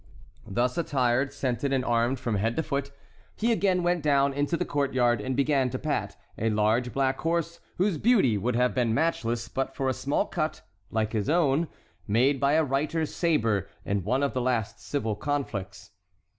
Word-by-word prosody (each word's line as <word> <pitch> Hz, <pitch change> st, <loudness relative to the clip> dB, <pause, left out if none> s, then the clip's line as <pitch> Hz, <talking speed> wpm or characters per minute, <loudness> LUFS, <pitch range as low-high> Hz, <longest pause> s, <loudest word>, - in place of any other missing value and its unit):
Thus 120 Hz, -, 0 dB
attired, 130 Hz, -3 st, +1 dB
scented, 135 Hz, -1 st, -2 dB
and 130 Hz, -1 st, +1 dB
armed 120 Hz, +2 st, +1 dB
from 115 Hz, -5 st, -1 dB
head 115 Hz, +4 st, 0 dB
to 160 Hz, -, 0 dB
foot, 140 Hz, -1 st, -2 dB, 0.5 s
he 230 Hz, +2 st, +1 dB
again 190 Hz, -5 st, +2 dB
went 175 Hz, -1 st, +1 dB
down 140 Hz, -2 st, +3 dB
into 145 Hz, +4 st, 0 dB
the -, -, -1 dB
court 140 Hz, -2 st, -1 dB
yard 120 Hz, -3 st, +3 dB
and 130 Hz, +4 st, -2 dB
began 140 Hz, -1 st, +2 dB
to -, -, -3 dB
pat -, -, -2 dB, 0.2 s
a 115 Hz, -, +1 dB
large 110 Hz, +3 st, +1 dB
black 135 Hz, +1 st, 0 dB
horse 170 Hz, 0 st, -1 dB, 0.2 s
whose 185 Hz, -4 st, +1 dB
beauty 200 Hz, -, +4 dB
would 115 Hz, +4 st, -1 dB
have 125 Hz, +1 st, +2 dB
been 120 Hz, -3 st, +1 dB
matchless 120 Hz, -7 st, 0 dB
but 135 Hz, +2 st, -3 dB
for 135 Hz, -, -1 dB
a 130 Hz, -, +2 dB
small 140 Hz, +3 st, 0 dB
cut, -, -, -3 dB, 0.3 s
like 110 Hz, 0 st, -1 dB
his 105 Hz, -2 st, -1 dB
own, 160 Hz, -1 st, +2 dB, 0.4 s
made 130 Hz, +6 st, +3 dB
by 140 Hz, +2 st, +2 dB
a 160 Hz, +1 st, +4 dB
reiter's 150 Hz, +3 st, -1 dB
sabre 115 Hz, -, +1 dB, 0.2 s
in 100 Hz, -1 st, -1 dB
one 130 Hz, +8 st, +1 dB
of 140 Hz, -, 0 dB
the 130 Hz, -, -1 dB
last 115 Hz, -4 st, -1 dB
civil 110 Hz, -7 st, -2 dB
conflicts. 120 Hz, -7 st, -4 dB
135 Hz, 185 wpm, -27 LUFS, 115-145 Hz, 0.5 s, beauty